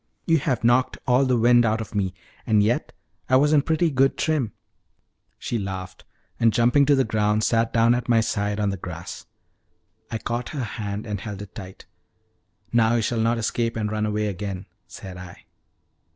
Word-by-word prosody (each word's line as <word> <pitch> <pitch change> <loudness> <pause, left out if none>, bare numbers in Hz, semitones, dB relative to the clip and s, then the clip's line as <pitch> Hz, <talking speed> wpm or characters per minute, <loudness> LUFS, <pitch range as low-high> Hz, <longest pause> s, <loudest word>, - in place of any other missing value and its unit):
You 165 -1 +3
have 135 -3 -1
knocked 120 +2 +3
all 125 +2 +3
the 130 -2 +2
wind 120 +1 +5
out 110 0 +1
of 110 - -7
me; 95 -3 -1 0.3
and 105 -2 +4
yet 115 +4 0 0.4
I 130 - +4
was 145 +3 +4
in 145 - +5
pretty 160 +2 +1
good 135 0 +2
trim." 150 -9 0 0.9
She 120 - -3
laughed, 95 -2 -6 0.3
and 115 -1 +4
jumping 120 +5 +3
to 145 - +5
the 135 - +3
ground, 105 -1 +1
sat 115 0 +2
down 115 +1 +4
at 120 0 -3
my 115 -1 +5
side 105 -2 -1
on 100 -1 +1
the 100 - -4
grass. 90 -1 -8 0.8
I 115 - -3
caught 120 +2 -4
her 130 - -1
hand 105 -2 -5
and 105 -3 -4
held 105 -1 -6
it 100 - -13
tight. 95 0 -10 0.9
"Now 115 0 +4
you 115 - +1
shall 115 +1 -1
not 115 +1 +1
escape 115 +1 -1
and 105 -1 -2
run 110 0 -1
away 105 0 -1
again," 100 -1 -4 0.2
said 95 -2 -10
I. 90 -1 -11
115 Hz, 190 wpm, -24 LUFS, 105-120 Hz, 0.9 s, wind